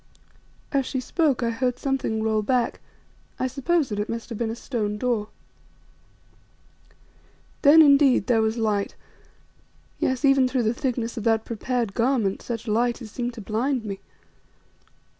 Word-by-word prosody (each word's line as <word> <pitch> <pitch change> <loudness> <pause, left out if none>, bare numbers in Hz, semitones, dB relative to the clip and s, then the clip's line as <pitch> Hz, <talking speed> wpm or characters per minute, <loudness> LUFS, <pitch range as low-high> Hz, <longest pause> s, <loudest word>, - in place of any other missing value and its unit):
As 270 -2 0
she 265 - -2
spoke 275 -1 0
I 230 - +1
heard 250 +1 -1
something 260 -5 -1
roll 220 -1 +1
back; 240 +2 0 0.6
I - - -1
suppose 275 +4 0
that 205 -1 -3
it 210 - -2
must 230 0 -5
have 230 - -5
been 230 -2 -1
a 225 - -3
stone 215 -4 -3
door. 225 -2 -1 2.3
Then, 315 +2 +8
indeed, 280 -2 +5
there 235 -3 +3
was 220 +1 0
light, 210 -3 -1 1.0
yes, 260 +2 0
even 275 -2 +5
through 255 -1 0
the 220 +1 +1
thicknesses 245 -3 -3
of 220 - -3
that 225 -1 +2
prepared 235 -2 -2
garment, 230 -5 0
such 235 -1 -5
light 235 +2 +1
as 225 -4 -10
seemed 245 +1 -4
to 225 - -8
blind 230 +4 -1
me. 195 -2 -5
240 Hz, 155 wpm, -24 LUFS, 220-260 Hz, 2.3 s, Then